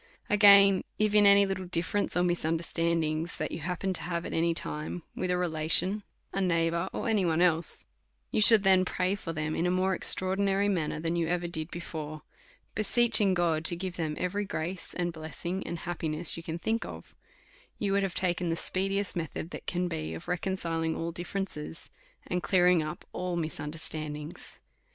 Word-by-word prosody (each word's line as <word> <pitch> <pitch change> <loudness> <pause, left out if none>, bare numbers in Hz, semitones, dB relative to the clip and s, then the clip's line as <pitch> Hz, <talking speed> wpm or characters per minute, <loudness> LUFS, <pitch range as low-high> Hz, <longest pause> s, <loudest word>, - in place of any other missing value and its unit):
Again; 200 -2 +7
If 215 -1 +1
any 200 -1 +7
little 190 -1 -3
difierence 175 +4 0
or 175 - +3
misunderstandings 165 -1 0
that - - -3
you - - -4
happened 180 +4 -2
to - - -9
have 170 -1 -3
at - - -5
any 165 0 +1
time 155 +2 -4
with 185 - -2
a 180 - +2
relation, 180 +4 +2 0.3
a 195 - 0
neighbour, 170 0 +1
or - - -3
any 215 -4 +2
one 165 -2 +1
else, 170 -2 +2 0.5
you - - +1
should 215 -1 +7
then 190 -1 +5
pray 185 +1 0
for 190 -4 -5
them 155 -1 -2
in 170 - 0
a - - +2
more 185 +1 +1
extraordinary 195 +2 +1
manner 165 -6 -1
than 165 +1 -1
you 170 -1 0
ever 175 0 -1
did 160 -1 -4
before, 155 -3 -6 0.5
beseeching 215 -2 +3
God 165 -3 +1
to 175 - +3
give 180 0 -5
them 155 -3 -2
every 190 +3 -1
grace, 180 -1 -4
and 175 -1 -1
blessing, 170 +4 -5
and 170 - -3
happiness 160 -1 -2
you 165 - -6
can 165 0 -5
think 225 +6 -1
of, - - -10 0.6
you 200 -2 -1
would 200 0 +2
have 195 -3 -2
taken 175 -1 0
the 165 - +1
speediest 195 +3 0
method 165 0 -4
that - - -8
can 180 0 0
be, 80 - -4
of 80 - -9
reconciling 170 -3 -1
all 165 +1 -3
dilferences, 175 -3 -5 0.3
and 180 0 -2
clearing 180 0 +4
up 155 0 -6
all 180 -1 -3
misunderstandings. 155 -1 -4
175 Hz, 180 wpm, -29 LUFS, 165-190 Hz, 0.6 s, Again